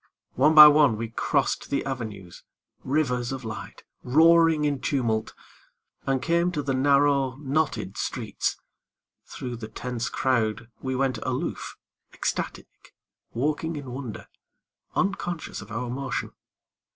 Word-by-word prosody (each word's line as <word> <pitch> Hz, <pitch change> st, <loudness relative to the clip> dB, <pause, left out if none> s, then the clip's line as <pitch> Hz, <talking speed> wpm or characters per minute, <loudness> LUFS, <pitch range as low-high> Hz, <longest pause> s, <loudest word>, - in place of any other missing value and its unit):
One 150 Hz, +5 st, +3 dB
by 150 Hz, -1 st, +13 dB
one 145 Hz, -6 st, +5 dB
we 115 Hz, +1 st, -4 dB
crossed 115 Hz, -, -1 dB
the 140 Hz, -, -1 dB
avenues, 110 Hz, -9 st, -6 dB, 0.4 s
Rivers 130 Hz, -4 st, 0 dB
of 135 Hz, -1 st, -5 dB
light, 110 Hz, 0 st, -7 dB, 0.2 s
roaring 160 Hz, +2 st, +5 dB
in 145 Hz, -2 st, 0 dB
tumult, 115 Hz, -6 st, -1 dB, 0.7 s
And 135 Hz, -1 st, 0 dB
came 170 Hz, +1 st, +2 dB
to 150 Hz, -3 st, -2 dB
the 135 Hz, 0 st, -1 dB
narrow, 140 Hz, 0 st, +3 dB
knotted 140 Hz, -7 st, -2 dB
streets. -, -, -2 dB, 0.7 s
Thru 125 Hz, -1 st, -6 dB
the 115 Hz, -2 st, -7 dB
tense 120 Hz, +1 st, -4 dB
crowd 115 Hz, -3 st, 0 dB
We 130 Hz, -1 st, -2 dB
went 130 Hz, -3 st, 0 dB
aloof, 130 Hz, +1 st, -4 dB, 0.4 s
ecstatic, -, -, -5 dB, 0.4 s
walking 150 Hz, +5 st, -1 dB
in 140 Hz, -4 st, -7 dB
wonder, 125 Hz, -4 st, -7 dB, 0.7 s
Unconscious 175 Hz, -4 st, -2 dB
of 105 Hz, +1 st, -12 dB
our 120 Hz, +3 st, -3 dB
motion. 130 Hz, -1 st, -3 dB
130 Hz, 125 wpm, -26 LUFS, 120-150 Hz, 0.7 s, by